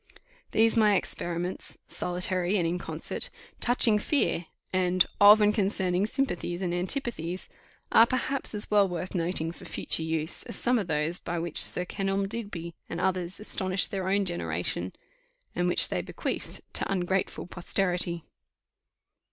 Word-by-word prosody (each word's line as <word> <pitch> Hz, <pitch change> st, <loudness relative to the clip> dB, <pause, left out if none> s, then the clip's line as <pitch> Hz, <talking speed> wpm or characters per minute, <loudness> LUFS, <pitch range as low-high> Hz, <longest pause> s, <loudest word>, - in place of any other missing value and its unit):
These, 225 Hz, +1 st, +3 dB
my 210 Hz, -3 st, +4 dB
experiments, 175 Hz, 0 st, -3 dB
solitary 180 Hz, +2 st, 0 dB
and 175 Hz, -, +1 dB
in 175 Hz, +2 st, -1 dB
concert, -, -, -2 dB, 0.3 s
touching 235 Hz, -3 st, +4 dB
fear, 210 Hz, -, +1 dB, 0.3 s
and 185 Hz, -1 st, +3 dB
of 210 Hz, +1 st, +8 dB
and 210 Hz, 0 st, +4 dB
concerning 190 Hz, -2 st, +1 dB
sympathies 190 Hz, -8 st, -2 dB
and 175 Hz, -1 st, -1 dB
antipathies, 185 Hz, -, -3 dB, 0.4 s
are 225 Hz, +1 st, +7 dB
perhaps 255 Hz, -1 st, -2 dB
as 210 Hz, -, -2 dB
well 205 Hz, -2 st, +4 dB
worth 180 Hz, +1 st, -5 dB
noting 165 Hz, -2 st, -1 dB
for -, -, -12 dB
future -, -, -1 dB
use, 160 Hz, -1 st, +1 dB
as -, -, -4 dB
some 245 Hz, 0 st, +2 dB
of 200 Hz, -, -3 dB
those 155 Hz, +2 st, 0 dB
by 175 Hz, 0 st, -4 dB
which 170 Hz, -1 st, +4 dB
Sir 180 Hz, -, +1 dB
Kenelm 195 Hz, +1 st, -1 dB
Digby 195 Hz, -6 st, -6 dB, 0.2 s
and 170 Hz, -, -4 dB
others 185 Hz, -1 st, -1 dB
astonished 190 Hz, -3 st, 0 dB
their 190 Hz, -1 st, -2 dB
own 200 Hz, +1 st, +2 dB
generation, 90 Hz, -, -2 dB, 0.6 s
and 180 Hz, 0 st, 0 dB
which 175 Hz, -, +3 dB
they -, -, -1 dB
bequeathed -, -, -4 dB
to -, -, -2 dB
ungrateful 190 Hz, 0 st, -1 dB
posterity. 175 Hz, -1 st, -1 dB
185 Hz, 145 wpm, -28 LUFS, 175-205 Hz, 0.6 s, of